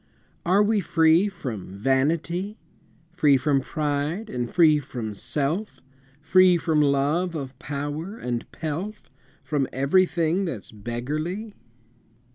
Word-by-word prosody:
Are 195 +4 +5
we 215 0 +2
free 165 +1 +4
from 115 - -6
vanity, 165 - 0 0.5
Free 150 -5 +4
from 135 +1 +1
pride, 150 +8 -2
and 120 -1 -2
free 155 -2 +5
from 120 -6 -5
self, 145 - -3 0.4
Free 180 +4 +5
from 160 -2 +1
love 150 +5 +1
of 135 -3 -6
power 145 +8 -4
and 120 - -4
pelf, 170 +7 -5 0.3
From 145 -4 0
everything 170 +5 +2
that's 130 - -6
beggarly? 150 - -4
155 Hz, 110 wpm, -25 LUFS, 135-180 Hz, 0.5 s, Are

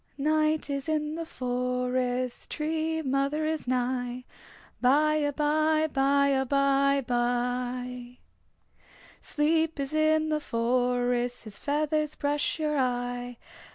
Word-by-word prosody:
Night 310 +1 +1
is 280 +1 -3
in 305 -1 -1
the 330 0 -5
forest, 250 -1 -2
Tree 320 +1 -2
Mother 275 +3 0
is 310 -4 -2
nigh. 250 0 -1 0.6
By 305 +4 +4
abye, 310 +1 +1
by 280 +1 +3
abye 275 0 +2
bye. 245 0 -2 1.0
Sleep 320 +1 0
is 275 +1 -3
in 310 0 +2
the 305 -1 +1
forest 245 0 0
His 215 -3 -9
feathers 305 +1 0
brush 290 +1 -1
your 300 -2 0
eye. 245 -1 -2
275 Hz, 105 wpm, -28 LUFS, 250-305 Hz, 1.0 s, By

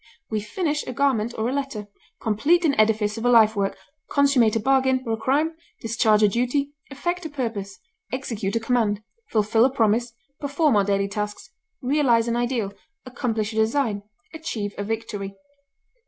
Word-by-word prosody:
We 215 - 0
finish 300 - -2
a - - -4
garment 240 -4 +1
or 220 +1 0
a 255 - -1
letter, 270 -7 -3 0.3
complete 290 +12 +2
an 290 - +3
edifice 215 0 +2
or 240 - 0
a - - +5
life 220 -2 +6
work, 200 -1 -1 0.3
consummate 275 -6 +3
a - - +2
bargain 260 +2 +2
or 225 - -1
a - - -1
crime, 290 +8 +1 0.2
discharge 220 -1 +2
a - - +7
duty, 250 +7 0 0.2
effect 345 +6 -3
a - - -11
purpose, 225 -9 -4 0.3
execute 230 -6 -3
a - - +2
command, 225 -3 0 0.3
fulfil 220 +1 +3
a 260 - +5
promise, 230 -1 +1 0.3
perform 285 -1 +1
our 205 - +4
daily 200 0 +1
tasks, 210 +3 -5 0.3
realize 250 -4 +3
an 235 - 0
ideal, 240 -4 -1 0.3
accomplish 225 -4 -2
a - - -5
design, 220 -2 +1 0.3
achieve 225 -11 -4
a 205 - -3
victory. 205 -2 -4
230 Hz, 170 wpm, -24 LUFS, 210-270 Hz, 0.3 s, a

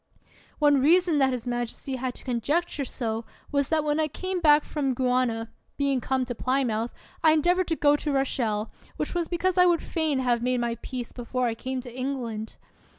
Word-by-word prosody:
One 290 -2 +4
reason 335 +1 +4
that 265 -1 +4
his 250 -2 -4
majesty 240 +2 -3
had 255 0 -3
to - - -11
conjecture 280 +6 -1
so 230 -3 -3 0.3
was 280 -1 +1
that 315 -1 +2
when 300 +1 0
I 310 - +2
came 370 +5 -3
back 300 -3 +5
from 275 -4 -1
Guiana, 250 -3 0 0.3
being 275 -2 +1
come 260 0 0
to 245 - -4
Plymouth, 245 -2 0 0.3
I 315 -1 +7
endeavored 350 +4 +2
to 325 - 0
go 290 -1 +4
to 295 - -2
Rochelle, 235 -6 0 0.3
which - - -2
was 345 -2 -1
be 345 - -2
cause 370 +1 +1
I 360 - +7
would 345 -2 +2
fain 315 -4 0
have 245 -2 +1
made 250 +1 +1
my 235 -1 0
peace 250 -2 -5
before 250 +1 -2
I 235 - +1
came 255 +3 -4
to 245 -1 -10
England. 245 -5 -4
265 Hz, 200 wpm, -26 LUFS, 245-305 Hz, 0.3 s, I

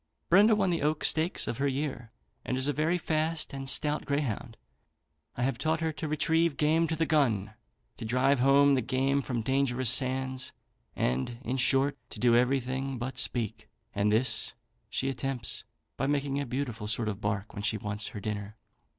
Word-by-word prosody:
Brenda 210 +5 +6
won 195 -3 +1
the 170 - -1
Oak 150 +1 0
stakes 160 +3 +2
of 115 - -3
her 140 - +2
year, 135 -4 -3 0.3
and 130 - -2
is 130 +2 +1
a 145 - +1
very 160 +4 +1
fast 160 -1 -1
and 135 -1 -4
stout 150 +2 0
greyhound. 130 -5 -2 0.8
I 125 - -1
have 130 -2 0
taught 160 +2 +1
her 160 -1 0
to 155 +1 -5
retrieve 160 +1 +1
game 160 +2 +3
to 160 - -1
the 160 +1 +1
gun, 115 -10 +1 0.4
to 115 - -6
drive 130 +4 +2
home 140 +2 +5
the 130 - +2
game 135 +3 +1
from 120 -4 -3
dangerous 130 -1 +2
sands, 130 0 0 0.4
and, 65 - -1
in 125 +2 -2
short, 135 +2 +2
to - - -7
do 120 -1 +4
everything 130 +1 0
but 125 +2 -3
speak; 115 -4 -2 0.2
and 100 +1 +1
this 115 +3 +3 0.4
she 135 - -1
attempts, 135 -3 -3 0.3
by 135 - 0
making 140 -1 0
a 140 - -4
beautiful 120 -4 -3
sort 110 +1 -1
of 105 0 -3
bark 100 0 -2
when 105 - -5
she 110 +1 0
wants 105 0 -3
her 105 - -7
dinner. 105 +1 -5
135 Hz, 185 wpm, -29 LUFS, 120-145 Hz, 0.8 s, Brenda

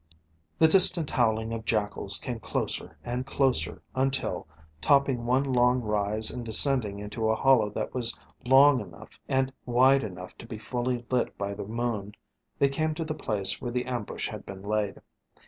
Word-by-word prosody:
The 160 - +6
distant 170 -3 +5
howling 110 -1 0
of 115 -1 -5
jackals 105 -2 -1
came 120 -3 -5
closer - - -3
and 125 +1 -3
closer 135 -1 0
until, 130 -10 -1 0.3
topping 135 - +2
one 130 +3 +2
long 125 -2 +2
rise 105 -1 +1
and 125 - -6
descending 115 -2 +3
into 105 +2 -3
a 110 - +2
hollow 125 -4 +3
that - - -5
was 120 -2 0 0.3
long 135 +2 +6
enough 90 -6 -12
and 130 0 0
wide 130 +3 +4
enough 90 -3 -8
to 115 - -10
be 115 - -7
fully 120 +2 -3
lit 125 -1 0
by 100 0 -3
the 100 - -6
moon, 110 -3 -3 0.4
they 140 - +3
came 155 +3 -1
to 165 - -4
the 155 - -3
place 105 -10 -1
where 125 - -3
the 125 +1 -2
ambush 120 -4 -4
had - - -8
been 95 -1 -10
laid. 105 -1 -2
120 Hz, 170 wpm, -27 LUFS, 105-130 Hz, 0.4 s, The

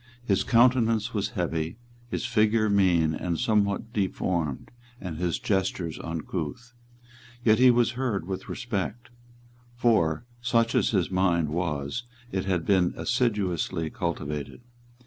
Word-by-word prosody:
His 100 -2 +2
countenance 115 -2 +3
was 105 -2 -1
heavy, 80 0 -2 0.3
his 120 - -3
figure 110 -2 +2
mean 90 -6 +3
and 85 +1 -2
somewhat 105 +2 0
deformed, 90 -7 -1 0.3
and 90 -5 -6
his 90 0 0
gestures 95 -4 -1
uncouth. 85 +7 -5 0.7
Yet 110 0 +5
he 130 0 +7
was 120 -1 +3
heard 120 -8 -2
with 95 0 -5
respect. 120 +1 -4 0.6
For, 115 -6 +2 0.2
such 115 -1 +2
as - - +3
his 95 -5 0
mind 90 -4 +2
was, 80 - -2 0.3
it 95 -1 -2
had 90 -4 0
been 95 -3 +2
assiduously 95 -9 0
cultivated. 75 - -4
95 Hz, 125 wpm, -27 LUFS, 85-115 Hz, 0.7 s, he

